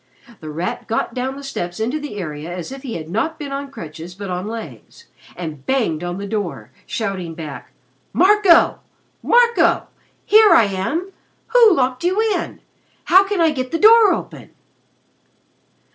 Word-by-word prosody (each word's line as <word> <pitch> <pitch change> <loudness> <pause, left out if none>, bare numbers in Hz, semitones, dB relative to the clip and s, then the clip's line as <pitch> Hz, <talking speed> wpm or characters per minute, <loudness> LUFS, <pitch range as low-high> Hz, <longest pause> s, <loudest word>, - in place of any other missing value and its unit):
The 155 - -9
Rat 165 +4 -4
got 225 +1 -2
down 255 +2 -3
the 280 - -10
steps 175 -10 -5
into 245 +8 -1
the 295 -7 -7
area 155 -3 -6
as 175 +5 -6
if 270 0 -8
he 260 -4 -6
had 160 -2 -6
not 225 - -2
been 290 -3 -7
on 280 0 -5
crutches 165 - -9
but 200 -1 -6
on 180 +2 -4
legs, 230 - -9 0.3
and 155 -6 -7
banged 220 -12 -1
on 175 +1 -4
the 200 - -5
door, 180 - -4 0.2
shouting 190 -7 -4
back: 140 -7 -8 0.4
"Marco! 385 -2 +4 0.4
Marco! 475 0 +3 0.4
Here 430 0 +6
I - - +6
am! 215 - -3 0.4
Who 455 -5 +6
locked 255 +1 0
you 370 +4 +1 0.2
in? 345 - -5 0.4
How 380 +3 +5
can 400 -2 -2
I 325 -2 +4
get 255 -3 -4
the 330 - -1
door 435 +2 +7
open?" - - -5
235 Hz, 160 wpm, -19 LUFS, -, 0.4 s, door